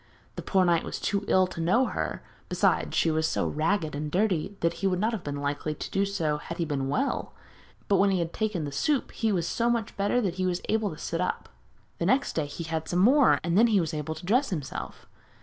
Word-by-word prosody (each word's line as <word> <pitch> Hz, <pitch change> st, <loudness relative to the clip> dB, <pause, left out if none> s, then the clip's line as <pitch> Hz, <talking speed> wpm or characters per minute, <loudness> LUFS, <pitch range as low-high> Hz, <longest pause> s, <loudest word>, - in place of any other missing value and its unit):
The -, -, -5 dB
poor 190 Hz, -2 st, +2 dB
knight 170 Hz, -2 st, +3 dB
was -, -, -5 dB
too 200 Hz, -1 st, -1 dB
ill 185 Hz, 0 st, +4 dB
to 180 Hz, -2 st, -6 dB
know 215 Hz, +11 st, +3 dB
her, -, -, -3 dB, 0.3 s
besides, -, -, +1 dB
she 165 Hz, -, +3 dB
was 160 Hz, 0 st, +1 dB
so -, -, 0 dB
ragged 160 Hz, +1 st, 0 dB
and 150 Hz, +1 st, -3 dB
dirty 195 Hz, +1 st, 0 dB
that 170 Hz, 0 st, +2 dB
he 195 Hz, -, +2 dB
would 180 Hz, -1 st, 0 dB
not 220 Hz, +4 st, +1 dB
have 215 Hz, -6 st, -4 dB
been 145 Hz, -1 st, -4 dB
likely 145 Hz, +2 st, -2 dB
to -, -, -7 dB
do 195 Hz, +1 st, +1 dB
so 165 Hz, -7 st, -1 dB
had 170 Hz, +3 st, -7 dB
he 170 Hz, -, 0 dB
been 140 Hz, -3 st, -2 dB
well; 270 Hz, -, -1 dB, 0.5 s
but 200 Hz, -, +3 dB
when 200 Hz, +1 st, +4 dB
he 190 Hz, -, +2 dB
had 170 Hz, -1 st, -2 dB
taken 210 Hz, -7 st, -1 dB
the 145 Hz, -, -4 dB
soup 270 Hz, -, 0 dB
he 225 Hz, -1 st, 0 dB
was 175 Hz, -4 st, 0 dB
so 235 Hz, +5 st, 0 dB
much 235 Hz, -3 st, -1 dB
better 205 Hz, +5 st, +2 dB
that 190 Hz, -6 st, -1 dB
he 185 Hz, -, +1 dB
was 180 Hz, -1 st, 0 dB
able 220 Hz, -1 st, +1 dB
to 155 Hz, -, -8 dB
sit 165 Hz, +3 st, -3 dB
up. 180 Hz, -, -2 dB, 0.5 s
The -, -, 0 dB
next 275 Hz, +2 st, +2 dB
day 155 Hz, -3 st, -1 dB
he 155 Hz, +4 st, -6 dB
had 160 Hz, -1 st, -3 dB
some 175 Hz, -, -1 dB
more, 260 Hz, +9 st, +5 dB
and 170 Hz, -1 st, 0 dB
then 225 Hz, +4 st, +6 dB
he 215 Hz, -4 st, +3 dB
was 165 Hz, -3 st, -2 dB
able 155 Hz, +1 st, -3 dB
to 160 Hz, -, -10 dB
dress 250 Hz, +9 st, +2 dB
himself. 150 Hz, -7 st, -5 dB
180 Hz, 250 wpm, -27 LUFS, 160-205 Hz, 0.5 s, then